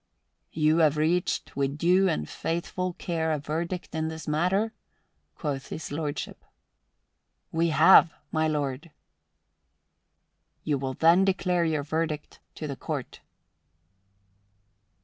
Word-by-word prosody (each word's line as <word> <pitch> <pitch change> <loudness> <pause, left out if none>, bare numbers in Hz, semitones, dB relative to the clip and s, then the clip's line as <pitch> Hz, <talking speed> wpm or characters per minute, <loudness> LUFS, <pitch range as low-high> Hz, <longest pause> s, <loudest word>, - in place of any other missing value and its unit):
"You 155 +1 +3
have 155 -2 +4
reached 170 +4 0
with 140 +1 -1
due 185 +4 +4
and 75 - -2
faithful 175 +2 -3
care 165 -2 -2
a 155 - +1
verdict 165 +5 -4
in 160 -1 -1
this 160 -1 -7
matter?" 185 +9 +1 0.6
quoth 140 -4 -4
His 160 - -6
Lordship. 145 -1 -4 1.1
"We 165 +1 +1
have, 160 +2 +7 0.2
my 160 -1 +1
lord." 145 0 -2 1.7
"You 145 -3 0
will 130 -1 -3
then 170 +6 +5
declare 180 -2 +1
your 155 -3 0
verdict 155 0 -3 0.2
to 155 - -6
the 140 - -4
Court." - - -5
160 Hz, 115 wpm, -27 LUFS, 150-170 Hz, 1.7 s, have